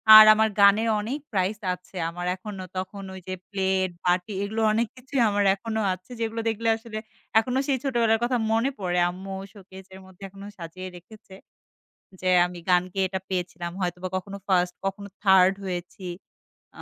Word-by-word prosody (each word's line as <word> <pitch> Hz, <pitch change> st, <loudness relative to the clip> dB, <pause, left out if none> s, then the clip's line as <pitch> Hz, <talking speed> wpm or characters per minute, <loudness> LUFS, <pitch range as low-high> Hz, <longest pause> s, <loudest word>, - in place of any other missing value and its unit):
আর 215 Hz, -, +12 dB
আমার 220 Hz, 0 st, +3 dB
গানে 200 Hz, +2 st, +7 dB, 0.2 s
অনেক 250 Hz, +8 st, -3 dB
প্রাইজ 195 Hz, +1 st, 0 dB, 0.2 s
আছে। 180 Hz, +1 st, -13 dB
আমার 175 Hz, +1 st, -6 dB
এখনো 190 Hz, 0 st, -7 dB
তখন 195 Hz, +2 st, -5 dB
ওইযে 185 Hz, 0 st, -7 dB, 0.2 s
প্লেট 190 Hz, -1 st, +1 dB, 0.2 s
বাটি 180 Hz, +3 st, +1 dB
এগুলো 220 Hz, +2 st, -2 dB
অনেক 230 Hz, +1 st, +1 dB
কিছুই 255 Hz, 0 st, -2 dB
আমার 205 Hz, 0 st, +1 dB
এখনো 220 Hz, +2 st, -4 dB
আছে। 185 Hz, +6 st, -12 dB
যেগুলো 225 Hz, 0 st, -2 dB
দেখলে 225 Hz, +1 st, -2 dB
আসলে 225 Hz, -1 st, -8 dB, 0.4 s
এখনো 250 Hz, +3 st, -1 dB
সেই 270 Hz, -2 st, +2 dB
ছোটবেলার 230 Hz, -4 st, +2 dB
কথা 245 Hz, 0 st, +2 dB
মনে 230 Hz, +4 st, +2 dB
পড়ে। 180 Hz, -2 st, 0 dB
আম্মু 190 Hz, +2 st, -7 dB, 0.2 s
শোকেজের 190 Hz, -1 st, -13 dB
মধ্যে 190 Hz, +1 st, -16 dB
এখনো 195 Hz, +1 st, -11 dB
সাজিয়ে 180 Hz, +2 st, -7 dB
রেখেছে। 190 Hz, +2 st, -14 dB, 0.9 s
যে 185 Hz, -, -1 dB, 0.2 s
আমি 180 Hz, 0 st, -9 dB
গান 180 Hz, -1 st, +5 dB
গেয়ে 195 Hz, -1 st, +1 dB
এটা 190 Hz, 0 st, -3 dB
পেয়েছিলাম। 175 Hz, -2 st, -3 dB
হয়তোবা 180 Hz, 0 st, -2 dB
কখনো 195 Hz, +1 st, -5 dB
1st, 180 Hz, -1 st, +2 dB
কখনো 200 Hz, +1 st, -4 dB, 0.2 s
3rd 190 Hz, 0 st, +6 dB
হয়েছি। 180 Hz, 0 st, -5 dB, 0.7 s
আ -, -, -7 dB
195 Hz, 165 wpm, -25 LUFS, 185-220 Hz, 0.9 s, আর